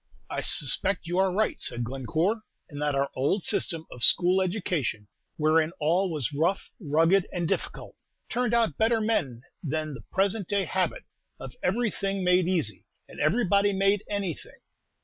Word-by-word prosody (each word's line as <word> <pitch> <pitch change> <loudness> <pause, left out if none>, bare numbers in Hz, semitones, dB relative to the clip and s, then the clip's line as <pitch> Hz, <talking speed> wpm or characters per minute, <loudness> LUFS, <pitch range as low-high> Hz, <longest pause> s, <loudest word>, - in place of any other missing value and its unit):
"I - - -2
suspect 180 +7 0
you 175 +2 -1
are 190 -1 +3
right," 215 +4 0
said 120 0 -2
Glencore, 155 - -1 0.3
"and 145 -1 -8
that 145 -1 0
our 140 0 0
old 145 +9 0
system 165 -1 0
of 120 - -6
school 185 +1 +5
education, 175 - -2 0.3
wherein 155 +1 +2
all 175 +5 +2
was 145 -4 -2
rough, 170 +7 0
rugged, 165 +3 +3
and 175 -2 -2
difficult, - - -4 0.3
turned 240 -1 0
out 225 -11 +1
better 225 +1 +3
men 145 - -1 0.2
than 155 0 -3
the 125 - -8
present 195 0 0
day 200 -1 +1
habit 180 0 -1 0.4
of 135 -1 -9
everything 195 -2 -1
made 180 -1 +3
easy 155 - -1 0.2
and - - -12
everybody 200 +3 +2
made 195 +1 +2
any 200 -4 -1
thing. - - -14
180 Hz, 160 wpm, -27 LUFS, 150-200 Hz, 0.4 s, school